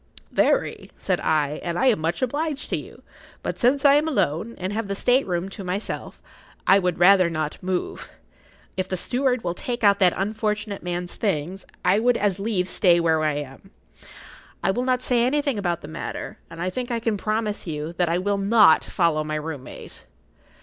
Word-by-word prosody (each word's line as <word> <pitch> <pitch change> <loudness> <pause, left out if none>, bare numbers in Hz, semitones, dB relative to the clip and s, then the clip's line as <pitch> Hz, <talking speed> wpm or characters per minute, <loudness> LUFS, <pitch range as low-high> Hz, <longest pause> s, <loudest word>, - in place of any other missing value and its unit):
"Very," - - +1
said - - -1
I; 150 -2 0
"and 170 0 -3
I - - +1
am 245 -8 +4
much 165 +7 -1
obliged 290 +3 -2
to - - +2
you. - - -9 0.4
But - - -4
since 270 +3 +2
I 280 - +8
am 295 +2 +3
alone, 230 - -1
and 185 +2 -3
have 220 -1 -2
the 200 - -2
state 250 +5 +2
room 175 0 -1
to 195 - -8
myself, 185 +3 -4 0.5
I 195 - +6
would 180 -2 -1
rather 185 0 +6
not 155 -2 -3
move. 185 0 -3 0.7
If 185 - -2
the 185 - -1
steward 250 +3 0
will 170 - -1
take 240 +6 -4
out 200 -1 +5
that 180 -2 +4
unfortunate 210 0 -2
man's 175 0 -4
things, 185 -2 -2 0.2
I 185 +3 +4
would 245 +1 +3
as 200 -2 0
leave 195 -3 -1
stay 175 -2 +4
where 160 -2 +2
I 155 -1 +2
am. 145 +5 -7 0.9
I - - +3
will 245 +5 -2
not 255 -1 +1
say 240 -2 +2
anything 280 -2 +1
about 175 -3 -1
the - - -9
matter, 160 +2 -6
and 165 0 -11
I 180 +2 -1
think 250 +4 -4
I 235 -1 -1
can 225 -1 0
promise 215 0 -2
you 155 +1 -4
that 175 -2 +2
I 170 - +1
will 200 +2 0
not 200 -4 +5
follow 165 -4 +1
my 155 0 -3
room 150 -3 -5
mate." - - -12
195 Hz, 200 wpm, -24 LUFS, 170-230 Hz, 0.9 s, I